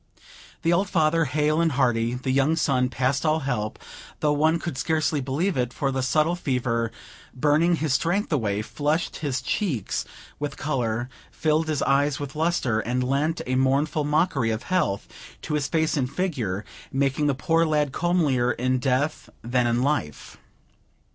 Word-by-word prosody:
The 165 Hz, -, +3 dB
old 190 Hz, +2 st, +1 dB
father, 165 Hz, -1 st, +2 dB
hale 150 Hz, +3 st, +1 dB
and 165 Hz, -3 st, +2 dB
hearty; 120 Hz, -3 st, +1 dB
the 130 Hz, +1 st, -2 dB
young 140 Hz, +4 st, +3 dB
son, 130 Hz, -5 st, +1 dB
past 130 Hz, +2 st, 0 dB
all 155 Hz, 0 st, +2 dB
help, 110 Hz, -6 st, -2 dB, 0.4 s
though 150 Hz, -1 st, +2 dB
one 155 Hz, +3 st, +3 dB
could 170 Hz, -3 st, -5 dB
scarcely 155 Hz, +1 st, 0 dB
believe 150 Hz, +8 st, -1 dB
it; 125 Hz, -2 st, 0 dB
for 135 Hz, +1 st, -1 dB
the 130 Hz, 0 st, -1 dB
subtle 155 Hz, +6 st, +2 dB
fever, 120 Hz, -7 st, -1 dB, 0.4 s
burning 155 Hz, +6 st, +3 dB
his 155 Hz, -4 st, -1 dB
strength 170 Hz, +6 st, 0 dB
away, 105 Hz, -6 st, 0 dB
flushed 150 Hz, +8 st, -1 dB
his 135 Hz, -5 st, -2 dB
cheeks 150 Hz, -, -1 dB, 0.4 s
with 145 Hz, 0 st, -4 dB
color, 120 Hz, -5 st, -1 dB, 0.2 s
filled 155 Hz, +1 st, 0 dB
his 155 Hz, -3 st, 0 dB
eyes 140 Hz, +1 st, +2 dB
with 145 Hz, -1 st, -6 dB
lustre, 155 Hz, -8 st, +1 dB
and 125 Hz, +3 st, -1 dB
lent 140 Hz, +6 st, 0 dB
a 130 Hz, -, -2 dB
mournful 140 Hz, +4 st, +1 dB
mockery 150 Hz, -5 st, +1 dB
of 110 Hz, 0 st, -2 dB
health 175 Hz, -, 0 dB, 0.4 s
to 150 Hz, -1 st, -1 dB
face 160 Hz, +2 st, 0 dB
and 130 Hz, -4 st, 0 dB
figure, 125 Hz, -, -2 dB, 0.3 s
making 140 Hz, +2 st, +1 dB
the 140 Hz, -, +1 dB
poor 165 Hz, +5 st, +2 dB
lad 150 Hz, -3 st, +1 dB
comelier 150 Hz, -8 st, +1 dB
in 130 Hz, +1 st, 0 dB
death 135 Hz, +4 st, -1 dB
than 120 Hz, +1 st, +1 dB
in 120 Hz, +1 st, +1 dB
life. 140 Hz, -, -2 dB
140 Hz, 160 wpm, -25 LUFS, 125-155 Hz, 0.4 s, The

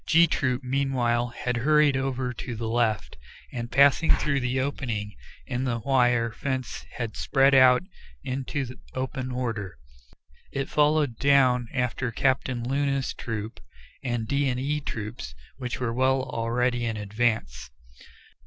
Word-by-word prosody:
G 165 Hz, +1 st, +6 dB
Troop 130 Hz, -5 st, -1 dB
meanwhile 125 Hz, -3 st, +1 dB
had 120 Hz, 0 st, -3 dB
hurried 150 Hz, +2 st, +4 dB
over 130 Hz, -1 st, -1 dB
to 120 Hz, +1 st, -6 dB
the 110 Hz, 0 st, -4 dB
left, 110 Hz, -, 0 dB, 0.4 s
and 120 Hz, -1 st, -5 dB
passing 140 Hz, +4 st, +5 dB
through 140 Hz, -2 st, +2 dB
the 125 Hz, 0 st, -1 dB
opening 115 Hz, -6 st, -3 dB, 0.3 s
in 125 Hz, 0 st, -2 dB
the 125 Hz, -3 st, 0 dB
wire 120 Hz, -2 st, +2 dB
fence 130 Hz, +1 st, -4 dB
had 115 Hz, -3 st, -4 dB
spread 135 Hz, 0 st, +3 dB
out 130 Hz, 0 st, +6 dB, 0.4 s
into 130 Hz, 0 st, -4 dB, 0.2 s
open 130 Hz, 0 st, -3 dB
order. 115 Hz, -, -3 dB, 0.7 s
It 135 Hz, 0 st, -3 dB
followed 150 Hz, -5 st, +2 dB
down 130 Hz, -3 st, +4 dB
after 125 Hz, -1 st, -1 dB
Captain 125 Hz, -1 st, 0 dB
Luna's 140 Hz, 0 st, 0 dB
troop 110 Hz, -1 st, -5 dB, 0.4 s
and 120 Hz, -3 st, -2 dB
D 140 Hz, +1 st, +1 dB
and 125 Hz, 0 st, -1 dB
E 145 Hz, +3 st, -1 dB
Troops, 105 Hz, -, -6 dB, 0.2 s
which 125 Hz, -2 st, -4 dB
were 120 Hz, -2 st, -1 dB
well 130 Hz, +1 st, +2 dB
already 120 Hz, 0 st, -1 dB
in 110 Hz, -1 st, -2 dB
advance. 105 Hz, -, -1 dB
125 Hz, 135 wpm, -26 LUFS, 115-135 Hz, 0.7 s, G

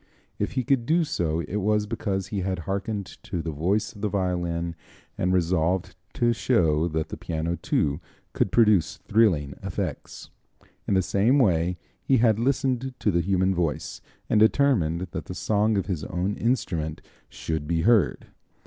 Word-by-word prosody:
If -, -, -2 dB
he 130 Hz, -, 0 dB
could 120 Hz, -1 st, +1 dB
do 165 Hz, +2 st, +3 dB
so 85 Hz, -, -1 dB
it 85 Hz, +6 st, -4 dB
was 105 Hz, +1 st, +1 dB
because 100 Hz, -3 st, -3 dB
he 100 Hz, -, -2 dB
had 95 Hz, 0 st, -1 dB
harkened 100 Hz, +1 st, -2 dB, 0.2 s
to 90 Hz, -, -4 dB
the 80 Hz, -, -3 dB
voice 95 Hz, +8 st, 0 dB
of 100 Hz, -, -12 dB
the 105 Hz, -, 0 dB
violin 85 Hz, -3 st, -1 dB, 0.4 s
and 90 Hz, -, 0 dB
resolved 90 Hz, +1 st, +1 dB, 0.2 s
to 120 Hz, 0 st, +2 dB
show 85 Hz, -10 st, +2 dB
that 80 Hz, -1 st, -2 dB
the -, -, -6 dB
piano, 80 Hz, +1 st, -2 dB
too, 75 Hz, -1 st, -1 dB, 0.3 s
could 95 Hz, -, 0 dB
produce 105 Hz, -6 st, +3 dB
thrilling 90 Hz, -11 st, +2 dB
effects. -, -, -5 dB, 0.6 s
In 100 Hz, -, +2 dB
the 95 Hz, -, +3 dB
same 110 Hz, +9 st, +2 dB
way 90 Hz, -, +2 dB, 0.2 s
he 135 Hz, -, +3 dB
had 110 Hz, -2 st, +3 dB
listened 130 Hz, 0 st, 0 dB
to 105 Hz, -, +1 dB
the 85 Hz, -1 st, +2 dB
human 95 Hz, +1 st, +1 dB
voice, 85 Hz, -4 st, -2 dB, 0.3 s
and 105 Hz, -, +3 dB
determined 110 Hz, -, +3 dB
that 80 Hz, -, -5 dB
the 90 Hz, -, -7 dB
song 105 Hz, +2 st, +1 dB
of 95 Hz, -, 0 dB
his 90 Hz, -6 st, -3 dB
own 95 Hz, +4 st, -2 dB
instrument 85 Hz, -10 st, -1 dB, 0.3 s
should 80 Hz, -2 st, -4 dB
be 85 Hz, 0 st, +1 dB
heard. 110 Hz, 0 st, +3 dB
95 Hz, 165 wpm, -25 LUFS, 85-110 Hz, 0.6 s, do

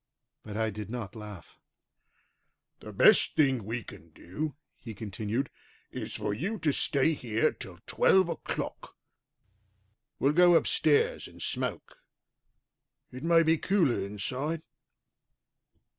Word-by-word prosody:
But 105 Hz, -1 st, -7 dB
I 110 Hz, -1 st, 0 dB
did 105 Hz, +1 st, -7 dB
not 115 Hz, -5 st, -6 dB
laugh. 105 Hz, -5 st, -11 dB, 1.2 s
"The -, -, -10 dB
best -, -, +5 dB
thing 135 Hz, -6 st, +2 dB
we 115 Hz, +3 st, -4 dB
can 85 Hz, -5 st, -13 dB
do," 110 Hz, -, -6 dB, 0.2 s
he 115 Hz, -3 st, -9 dB
continued, 110 Hz, +5 st, -3 dB, 0.4 s
"is -, -, -5 dB
for 105 Hz, -, -2 dB
you 195 Hz, -, -3 dB
to 150 Hz, -7 st, 0 dB
stay 140 Hz, +4 st, +2 dB
here 115 Hz, -6 st, 0 dB
till -, -, -10 dB
twelve 190 Hz, -2 st, +3 dB
o'clock. 170 Hz, -, -5 dB, 1.2 s
We'll 140 Hz, +2 st, +2 dB
go 175 Hz, +1 st, +6 dB
upstairs 155 Hz, -2 st, +2 dB
and -, -, -15 dB
smoke; -, -, -3 dB, 1.1 s
it 130 Hz, -, -9 dB
may 165 Hz, 0 st, +5 dB
be 160 Hz, 0 st, +2 dB
cooler 175 Hz, -, +2 dB
inside." 130 Hz, +11 st, -3 dB
125 Hz, 120 wpm, -29 LUFS, 105-160 Hz, 1.2 s, go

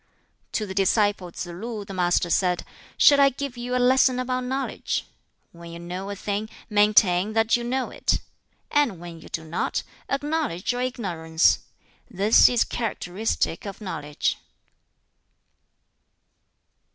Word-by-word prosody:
To 215 Hz, -, 0 dB
the 190 Hz, -, -6 dB
disciple 195 Hz, -1 st, +1 dB
Tsz -, -, -5 dB
lu 205 Hz, +5 st, -6 dB
the 195 Hz, -, -8 dB
Master 175 Hz, -1 st, +1 dB
said, 180 Hz, -2 st, +1 dB, 0.3 s
"Shall 285 Hz, -1 st, +7 dB
I 275 Hz, -, +7 dB
give 275 Hz, -1 st, -5 dB
you 245 Hz, +1 st, -3 dB
a -, -, +3 dB
lesson 255 Hz, 0 st, +4 dB
about 255 Hz, 0 st, -2 dB
knowledge? 265 Hz, +2 st, -2 dB, 0.5 s
When 170 Hz, 0 st, -12 dB
you 170 Hz, -, -8 dB
know 180 Hz, +3 st, -6 dB
a 200 Hz, -, -4 dB
thing, 205 Hz, +2 st, -3 dB, 0.2 s
maintain 205 Hz, -2 st, +4 dB
that 225 Hz, 0 st, +3 dB
you 240 Hz, -, -2 dB
know 255 Hz, +2 st, -2 dB
it; -, -, 0 dB, 0.5 s
and 280 Hz, -, +2 dB
when 170 Hz, -1 st, -9 dB
you -, -, -13 dB
do 160 Hz, -, -4 dB
not, 160 Hz, +2 st, -2 dB, 0.3 s
acknowledge 285 Hz, -, -1 dB
your 245 Hz, 0 st, -3 dB
ignorance. 175 Hz, -10 st, +1 dB, 0.5 s
This 205 Hz, +1 st, +5 dB
is 245 Hz, -2 st, +3 dB
characteristic 210 Hz, -4 st, -2 dB
of 200 Hz, 0 st, -7 dB
knowledge." 150 Hz, -8 st, -2 dB
205 Hz, 140 wpm, -25 LUFS, 180-250 Hz, 0.5 s, Shall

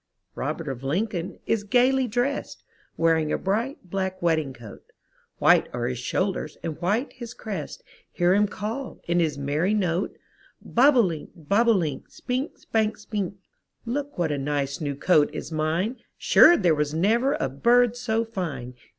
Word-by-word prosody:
Robert 155 Hz, +3 st, -4 dB
of 130 Hz, -3 st, -4 dB
Lincoln 175 Hz, +4 st, -2 dB
is 225 Hz, -2 st, 0 dB
gayly 255 Hz, +4 st, +3 dB
drest. 245 Hz, +5 st, -2 dB, 0.3 s
Wearing 160 Hz, -2 st, +2 dB
a -, -, +1 dB
bright, 220 Hz, +3 st, -2 dB
black 190 Hz, -1 st, -2 dB
wedding 160 Hz, -5 st, +1 dB
coat; 120 Hz, -5 st, -12 dB, 0.6 s
White -, -, +4 dB
are 120 Hz, -1 st, -2 dB
his 125 Hz, 0 st, -2 dB
shoulders 180 Hz, +3 st, -2 dB
and 165 Hz, 0 st, -5 dB
white 210 Hz, +10 st, 0 dB
his 235 Hz, -2 st, -9 dB
crest, 195 Hz, -9 st, -6 dB, 0.3 s
Hear 175 Hz, 0 st, +2 dB
him 205 Hz, +1 st, +3 dB
call, 225 Hz, +6 st, -5 dB
in 175 Hz, +1 st, +2 dB
his 160 Hz, -4 st, 0 dB
merry 150 Hz, +9 st, 0 dB
note, 180 Hz, -2 st, -1 dB, 0.4 s
Bob 265 Hz, +3 st, +4 dB
o* -, -, +8 dB
link, 165 Hz, -7 st, -2 dB
bob 200 Hz, +9 st, +1 dB
o' 230 Hz, -, +6 dB
link, 160 Hz, -9 st, -2 dB
Spink, 255 Hz, +4 st, -4 dB
spank, 220 Hz, -1 st, -1 dB
spink. 205 Hz, -3 st, -4 dB, 0.5 s
Look 285 Hz, +4 st, -3 dB
what 170 Hz, -3 st, 0 dB
a 145 Hz, -, -1 dB
nice 140 Hz, 0 st, -2 dB
new 145 Hz, -2 st, -2 dB
coat 150 Hz, 0 st, +3 dB
is -, -, -6 dB
mine, 165 Hz, +10 st, -1 dB, 0.2 s
Sure 345 Hz, -, +7 dB
there 175 Hz, -4 st, +3 dB
was 150 Hz, 0 st, -1 dB
never 230 Hz, -, +2 dB
a -, -, -1 dB
bird 235 Hz, -, +3 dB
so 230 Hz, -2 st, -1 dB
fine! 165 Hz, -, -5 dB
185 Hz, 165 wpm, -25 LUFS, 155-230 Hz, 0.6 s, o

